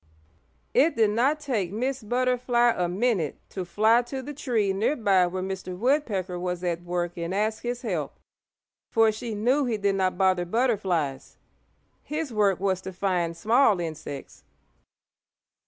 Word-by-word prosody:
It 295 Hz, +6 st, +4 dB
did 220 Hz, -2 st, +3 dB
not 265 Hz, +8 st, +2 dB
take 225 Hz, -, -2 dB
Miss 255 Hz, +5 st, -2 dB
Butterfly 245 Hz, +1 st, +2 dB
a 180 Hz, -, 0 dB
minute 190 Hz, -, 0 dB
to 190 Hz, -, -4 dB
fly 220 Hz, +6 st, +3 dB
to 260 Hz, +2 st, -6 dB
the 295 Hz, +3 st, -6 dB
tree 225 Hz, -8 st, 0 dB
near 215 Hz, +9 st, +1 dB
by 195 Hz, -7 st, +3 dB
where 185 Hz, +1 st, -4 dB
Mr. 185 Hz, -1 st, -5 dB
Woodpecker 210 Hz, -, 0 dB
was 180 Hz, 0 st, -3 dB
at 175 Hz, -1 st, -1 dB
work 175 Hz, 0 st, -3 dB
and 170 Hz, +2 st, -3 dB
ask 215 Hz, +2 st, 0 dB
his 245 Hz, +1 st, -4 dB
help, 170 Hz, -, -3 dB, 0.7 s
for 225 Hz, -1 st, +4 dB
she 220 Hz, +1 st, -5 dB
knew 255 Hz, +7 st, +2 dB
he 235 Hz, -3 st, -1 dB
did 200 Hz, -1 st, +1 dB
not 185 Hz, -2 st, 0 dB
bother 185 Hz, -2 st, +2 dB
butterflies. 180 Hz, -, -1 dB, 0.6 s
His 300 Hz, -3 st, -4 dB
work 205 Hz, -3 st, +2 dB
was 190 Hz, -1 st, 0 dB
to 190 Hz, -, -6 dB
find 180 Hz, -3 st, -1 dB
small 220 Hz, -1 st, +3 dB
insects. 155 Hz, -4 st, -7 dB
205 Hz, 155 wpm, -26 LUFS, 180-240 Hz, 0.7 s, It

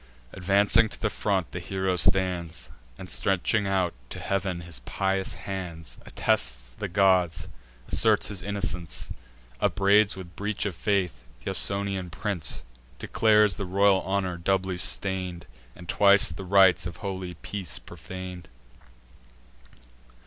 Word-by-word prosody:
Advancing 100 Hz, +4 st, +4 dB
to -, -, -5 dB
the 110 Hz, -, -1 dB
front, 95 Hz, -4 st, -1 dB
the 90 Hz, -, -5 dB
hero 95 Hz, +1 st, -1 dB
stands, 90 Hz, -1 st, 0 dB, 0.3 s
And, 95 Hz, -, -9 dB
stretching 100 Hz, +4 st, +1 dB
out 95 Hz, -3 st, +1 dB, 0.2 s
to -, -, -7 dB
heav'n 95 Hz, -3 st, -2 dB
his 85 Hz, -5 st, -8 dB
pious 95 Hz, +9 st, -1 dB
hands, 90 Hz, -5 st, -7 dB
Attests -, -, -1 dB
the -, -, -5 dB
gods, 90 Hz, -3 st, +2 dB, 0.4 s
asserts -, -, +3 dB
his 100 Hz, -3 st, -4 dB
innocence, 100 Hz, -4 st, -3 dB, 0.5 s
Upbraids 100 Hz, +1 st, +3 dB
with 90 Hz, -3 st, -10 dB
breach 105 Hz, +1 st, -3 dB
of 100 Hz, -, -2 dB
faith 95 Hz, -, -1 dB, 0.2 s
th' -, -, -2 dB
Ausonian 100 Hz, -2 st, 0 dB
prince; 90 Hz, -, -2 dB, 0.3 s
Declares 105 Hz, -, +3 dB
the 100 Hz, -, -3 dB
royal 100 Hz, +1 st, +3 dB
honour 95 Hz, -2 st, -2 dB
doubly 95 Hz, +1 st, 0 dB
stain'd, 90 Hz, -2 st, -1 dB, 0.3 s
And 85 Hz, -, -12 dB
twice 100 Hz, -2 st, +6 dB
the 95 Hz, +4 st, -7 dB
rites 95 Hz, -1 st, +5 dB
of 85 Hz, -, -8 dB
holy 95 Hz, -3 st, -5 dB
peace 95 Hz, +3 st, -5 dB
profan'd. 90 Hz, -2 st, -9 dB
95 Hz, 125 wpm, -26 LUFS, 90-100 Hz, 0.5 s, twice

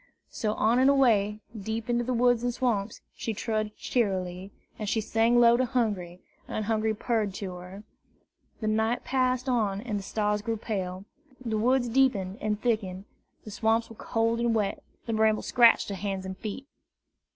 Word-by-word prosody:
So 215 Hz, -1 st, -2 dB
on 230 Hz, +3 st, +3 dB
and 265 Hz, +1 st, +5 dB
away, 215 Hz, -7 st, +3 dB
deep 220 Hz, +2 st, -4 dB
into 240 Hz, 0 st, +1 dB
the 250 Hz, -, -2 dB
woods 245 Hz, 0 st, +3 dB
and 245 Hz, -, +1 dB
swamps, 230 Hz, -4 st, -1 dB
she 225 Hz, -, -4 dB
trudged 215 Hz, -1 st, -2 dB
cheerily; 190 Hz, -4 st, -1 dB, 0.3 s
and 210 Hz, -2 st, -2 dB
she 225 Hz, -, +1 dB
sang 225 Hz, +2 st, +2 dB
low 235 Hz, 0 st, +6 dB
to 255 Hz, -, +2 dB
Hungry, 205 Hz, -8 st, -1 dB, 0.3 s
and 215 Hz, -, -3 dB
Hungry 220 Hz, 0 st, 0 dB
purred 215 Hz, -3 st, -1 dB
to 190 Hz, -3 st, -5 dB
her. 180 Hz, +3 st, -10 dB, 0.8 s
The 215 Hz, -, -1 dB
night 220 Hz, +2 st, +1 dB
passed 255 Hz, 0 st, 0 dB
on 215 Hz, -6 st, +1 dB
and 215 Hz, -3 st, -3 dB
the -, -, -6 dB
stars 210 Hz, +1 st, -1 dB
grew 225 Hz, +1 st, -2 dB
pale, 190 Hz, -3 st, -4 dB, 0.3 s
the 230 Hz, -4 st, -3 dB
woods 250 Hz, +2 st, +2 dB
deepened 225 Hz, -6 st, +1 dB
and 210 Hz, -1 st, -1 dB
thickened, 200 Hz, -5 st, -1 dB, 0.4 s
the 215 Hz, -, -8 dB
swamps 225 Hz, +2 st, +1 dB
were -, -, -10 dB
cold 230 Hz, +1 st, 0 dB
and 235 Hz, -1 st, +1 dB
wet, 205 Hz, -2 st, -1 dB, 0.2 s
the 230 Hz, -, -2 dB
brambles 220 Hz, 0 st, +2 dB
scratched 235 Hz, -3 st, +5 dB
her 200 Hz, -, -3 dB
hands 195 Hz, -1 st, -3 dB
and 190 Hz, 0 st, -5 dB
feet. 215 Hz, +6 st, -6 dB
220 Hz, 175 wpm, -28 LUFS, 200-235 Hz, 0.8 s, low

